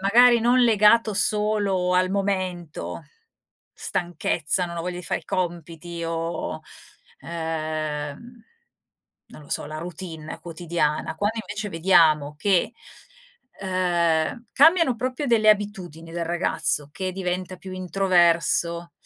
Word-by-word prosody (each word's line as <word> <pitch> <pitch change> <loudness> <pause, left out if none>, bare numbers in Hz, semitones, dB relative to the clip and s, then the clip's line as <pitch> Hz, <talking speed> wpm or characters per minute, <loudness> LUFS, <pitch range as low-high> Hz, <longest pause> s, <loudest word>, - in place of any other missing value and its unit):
magari 235 +4 +6
non 245 +2 +4
legato 220 -1 +4
solo 205 -3 +1
al 185 0 +2
momento, 185 -4 -3 0.7
stanchezza, 175 0 -1
"non 170 0 -7
ho - - -3
voglia 180 0 -4
di 180 - -8
fare - - -2
i - - -24
compiti", 170 -1 -4
o, 165 0 -3 0.6
ehm, 155 - -4 0.8
non - - -14
lo 145 - -16
so - - -2
la 155 +1 -6
routine 165 -2 -7
quotidiana. 165 -3 -2
Quando 205 +5 -1
invece 205 +1 -5
vediamo 160 -4 +3
che, 195 +5 +1 0.9
ehm, 180 +2 0
cambiano 320 -4 +5
proprio 255 +4 -3
delle 225 -3 +3
abitudini 185 -6 -2
del 170 -1 -2
ragazzo, 170 -3 0
che 185 +1 -3
diventa 185 0 -3
più 185 +1 -10
introverso, 175 -2 +2
180 Hz, 115 wpm, -24 LUFS, 165-205 Hz, 0.9 s, magari